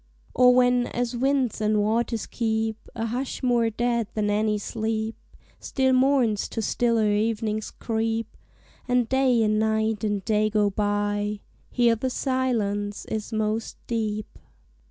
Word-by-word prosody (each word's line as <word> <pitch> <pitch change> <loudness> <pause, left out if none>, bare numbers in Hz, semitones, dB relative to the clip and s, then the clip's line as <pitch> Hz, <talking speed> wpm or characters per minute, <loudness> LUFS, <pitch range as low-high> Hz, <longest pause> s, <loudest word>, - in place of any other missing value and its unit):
Or 250 0 +6
when, 245 -1 +3
as 245 0 -2
winds 260 -3 0
and 215 0 +2
waters 225 +2 0
keep 220 -1 -2
A 225 -1 -2
hush 250 +4 -4
more 240 -2 +2
dead 235 0 0
than 210 -1 0
any 210 0 +1
sleep, 220 +1 -3 0.4
Still 265 -1 +1
morns 255 -5 +2
to 225 - -4
stiller 230 -2 +1
evenings 215 0 -1
creep, 225 0 -2 0.5
And 245 -2 +2
Day 260 -2 +3
and 215 0 +2
Night 220 0 0
and 205 -2 -1
Day 215 0 +2
go 210 -1 +2
by; 205 0 -1 0.3
Here 235 -2 +3
the 255 +4 -2
silence 225 -7 -1
is 220 +1 -3
most 220 0 -2
deep. 215 -2 -3
225 Hz, 135 wpm, -25 LUFS, 215-245 Hz, 0.5 s, Or